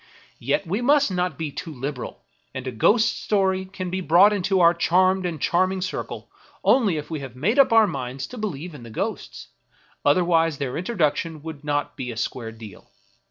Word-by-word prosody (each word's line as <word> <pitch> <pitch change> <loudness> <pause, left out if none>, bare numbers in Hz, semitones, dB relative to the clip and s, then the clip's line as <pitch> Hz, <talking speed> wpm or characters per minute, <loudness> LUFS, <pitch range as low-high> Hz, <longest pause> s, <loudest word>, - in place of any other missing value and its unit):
Yet 140 +5 0
we 195 +7 -2
must 280 -2 +3
not 180 -4 -1
be 160 -3 -4
too 165 +3 -7
liberal; 135 -1 -6 0.3
and 130 0 -5
a 130 - -3
ghost 215 - +2
story 190 -2 +1
can 185 -1 -6
be 185 +1 -2
brought 180 +5 +5
into 195 -1 +1
our 170 -1 +6
charmed 185 +2 +2
and 165 -3 -5
charming 185 +5 +1
circle 185 0 -5 0.4
only 210 -11 +3
if 150 +1 -6
we 155 - -3
have 135 -3 -8
made 205 - +1
up 275 - +6
our 225 -1 +6
minds 135 -6 -4
to - - -7
believe 180 -5 -4
in 145 - -10
the 115 - -10
ghosts; 110 - -5 0.5
other 160 +5 +3
wise 165 -3 +2
their 135 -2 -3
introduction 165 -5 -1
would 160 -3 -8
not 145 -1 -2
be 125 -2 -5
a 115 - -8
square 115 -1 -3
deal. 110 -4 -13
170 Hz, 195 wpm, -23 LUFS, 140-190 Hz, 0.5 s, our